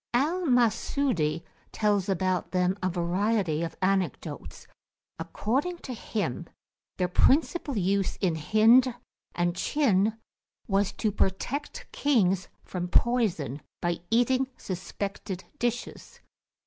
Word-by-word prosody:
Al 330 +7 +1
Masudi 230 - +1 0.3
tells 205 -2 +1
about 185 -1 0
them 180 0 +1
a 185 - +1
variety 180 -1 0
of 165 -1 -3
anecdotes. 185 -6 -2 0.5
According 255 - -1
to 255 - -4
him 175 - -3 0.5
their 180 - +1
principal 285 - +2
use 195 0 +1
in 185 -4 +1
Hind 225 - +4 0.4
and 175 0 0
Chin 220 -3 +2 0.5
was 200 -1 +1
to 215 - -1
protect 215 +9 -2
kings 195 -10 +2 0.2
from 180 -1 -4
poison, 175 - +1 0.2
by 175 -1 -1
eating 255 +3 +3
suspected 190 0 -5 0.2
dishes. 240 0 -3
200 Hz, 105 wpm, -27 LUFS, 180-240 Hz, 0.5 s, Hind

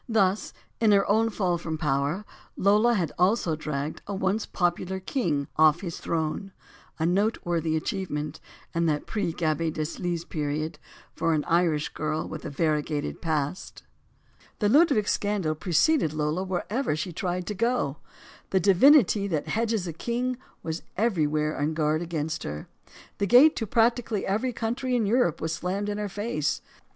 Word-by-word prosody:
Thus, 200 -3 +2 0.3
in 220 -2 +4
her 195 -1 +4
own 225 +2 +3
fall 180 -5 0
from 160 -1 -4
power, 150 +5 0 0.3
Lola 210 +5 +4
had 170 -7 0
also 180 -3 +2
dragged 150 -1 -4
a 200 - -3
once 195 +3 0
popular 175 +1 -1
king 170 - -1
off 155 +1 +5
his 175 -4 -5
throue; 165 +4 -2 0.5
a 160 - 0
noteworthy 175 -4 +1
achievement, 155 -5 -3 0.3
in 170 0 +1
that 150 -2 0
pre 205 -6 -2
Gaby 160 0 0
Deslys 170 +2 -3
period, 150 +1 -3 0.3
for 165 -1 +1
an 150 - 0
Irish 165 -3 +2
girl 155 +1 -3
with 155 - -7
a - - -3
variegated 150 0 -1
past. 155 +1 -3 0.7
The 205 - +1
Ludwig 275 -6 +4
scandal 205 -6 0
preceded 170 - +2
Lola 155 +4 -1
wherever 190 - -1
she 170 +3 -4
tried 180 +1 -2
to 210 - -3
go. 225 - 0 0.5
The 190 - +2
divinity 200 - +5
that 155 -6 -2
hedges 225 -3 0
a 170 - -4
king 245 +7 -2 0.2
was 160 0 -3 0.2
everywhere 155 -8 +1
on 150 +2 0
guard 155 0 +1
against 160 -2 -3
her. 75 +1 -6 0.5
The 200 - +1
gate 260 - +7
to 225 - -2
prac 230 +3 +3
tically 225 -4 -3
every 220 +6 0
country 245 +3 -2
in 230 -3 +2
Europe 210 - +2
was 160 0 -1
slammed 190 +6 -2
in 205 0 -3
her 210 -1 -2
face. 200 -7 -2
175 Hz, 160 wpm, -26 LUFS, 155-210 Hz, 0.7 s, gate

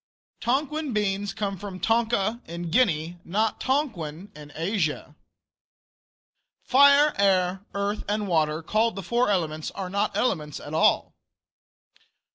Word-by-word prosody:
Tonquin 285 +3 -1
beans 205 -1 -1
come 200 -2 -3
from 195 -2 -7
Tonka, 225 0 +1
in 170 0 -6
Guinea, 175 -7 +1
not 215 +5 -1
Tonquin, 205 - -2
in 150 -1 -11
Asia. 165 -4 -2 1.5
Fire, 280 +2 +6
air, 190 -1 +2
earth, 200 +1 -2
and 210 0 -1
water, 160 -2 +1
called 220 +4 +1
the 195 - -5
four 235 +5 +1
elements, 155 -5 -1
are 185 -2 -6
not 200 +2 -1
elements 150 - -1
at 145 - -9
all. 160 - +2
200 Hz, 120 wpm, -25 LUFS, 170-230 Hz, 1.5 s, Fire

